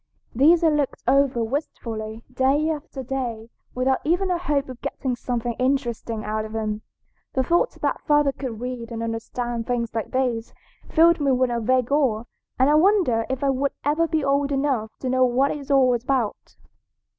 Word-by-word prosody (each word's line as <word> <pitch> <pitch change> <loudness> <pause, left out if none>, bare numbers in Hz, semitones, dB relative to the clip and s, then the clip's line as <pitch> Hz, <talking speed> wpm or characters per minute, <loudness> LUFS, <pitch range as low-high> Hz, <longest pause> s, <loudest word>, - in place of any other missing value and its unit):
These 320 +8 +5
I 325 - +6
looked 295 -3 -1
over 270 -2 +3
wistfully, 225 -4 -4
day 280 +5 +2
after 295 -3 -6
day, 235 -3 -4 0.2
without 260 +1 +1
even 360 +4 +1
a 350 - 0
hope 295 -5 0
of 255 -2 -9
getting 255 -2 -3
something 240 -1 -2
interesting 240 -4 -1
out 215 0 -2
of 215 0 -8
them. 215 -1 -2 0.5
The 260 - +1
thought 345 - +1
that - - -1
father 295 -2 +3
could 255 -5 -6
read 245 -1 -5
and 230 0 -4
understand 230 +1 -3
things 235 -2 -1
like 225 -2 -3
these 245 -3 -1 0.3
filled 335 +1 +5
me 280 -2 +2
with 255 -1 +2
a 235 - 0
vague 255 +2 +1
awe, 260 -7 +2 0.3
and 260 - +4
I 295 - +4
wondered 310 - +3
if 265 +1 -2
I 275 - +3
would 275 +1 -1
ever 310 +3 +2
be 315 -2 0
old 280 +1 +1
enough 270 -6 0
to 260 - -3
know 255 0 +3
what 255 +3 +2
it - - -3
was 280 - -11
all 265 -3 +4
about. 240 -2 -2
260 Hz, 185 wpm, -23 LUFS, 235-285 Hz, 0.5 s, I